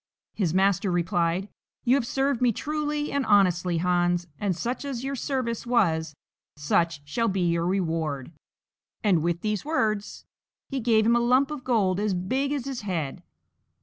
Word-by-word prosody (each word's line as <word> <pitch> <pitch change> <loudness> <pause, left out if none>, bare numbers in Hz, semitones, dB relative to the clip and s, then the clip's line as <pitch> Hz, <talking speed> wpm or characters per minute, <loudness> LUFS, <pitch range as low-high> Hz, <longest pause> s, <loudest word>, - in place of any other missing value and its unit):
His 185 -7 0
Master 195 +2 +2
replied, 175 +1 0 0.4
"You 250 +2 +5
have 240 -4 0
served 270 -1 0
me 245 -1 +4
truly 300 +4 -2
and 280 -1 0
honestly, 180 -5 +3
Hans, 175 0 +1
and 200 -3 0
such 240 - -3
as 265 -4 -4
your 275 +1 -2
service 255 -4 -2
was, 160 -10 +1 0.4
such 145 0 0
shall 230 +10 0
be 195 -2 0
your 170 -1 +1
reward;" 160 -7 -1 0.7
and 190 -6 +3
with 170 +1 -1
these 210 -2 -1
words 215 -9 -1 0.4
he 275 - -2
gave 220 -2 +3
him 235 +1 +4
a - - +4
lump 255 +4 +3
of 295 -4 -5
gold 200 -7 +1
as 205 -2 0
big 260 +11 -1
as 285 -4 -2
his 270 -3 -4
head. 170 -9 -3
200 Hz, 165 wpm, -26 LUFS, 175-250 Hz, 0.7 s, You